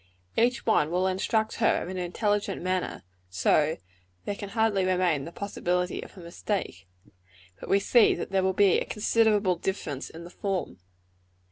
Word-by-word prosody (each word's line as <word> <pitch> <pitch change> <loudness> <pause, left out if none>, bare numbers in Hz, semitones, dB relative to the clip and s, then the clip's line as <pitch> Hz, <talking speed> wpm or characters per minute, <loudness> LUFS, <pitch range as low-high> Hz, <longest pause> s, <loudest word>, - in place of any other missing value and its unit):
Each 245 +1 +1
one 155 -9 +3
will 180 +2 0
instruct 215 +4 0
her 225 - +2
in 180 - -6
an 180 - -2
intelligent 205 +2 -1
manner, 185 0 -2 0.3
so 90 +2 +1 0.2
that - - -33 0.4
there 205 - -2
can 200 0 -7
hardly 220 -2 +1
remain 180 -6 +1
the 170 - -8
possibility 180 -2 -2
of - - -12
a - - -9
mistake; 170 - -4 0.7
but - - -9
we 195 - +4
see 230 +3 +4
that - - -6
there 195 -1 +2
will 190 0 +2
be 195 -1 +4
a - - -3
considerable 210 -4 +2
difference 160 -7 -4
in 165 +1 -10
the 175 - -11
form. 195 - -3
190 Hz, 170 wpm, -27 LUFS, 175-205 Hz, 0.7 s, we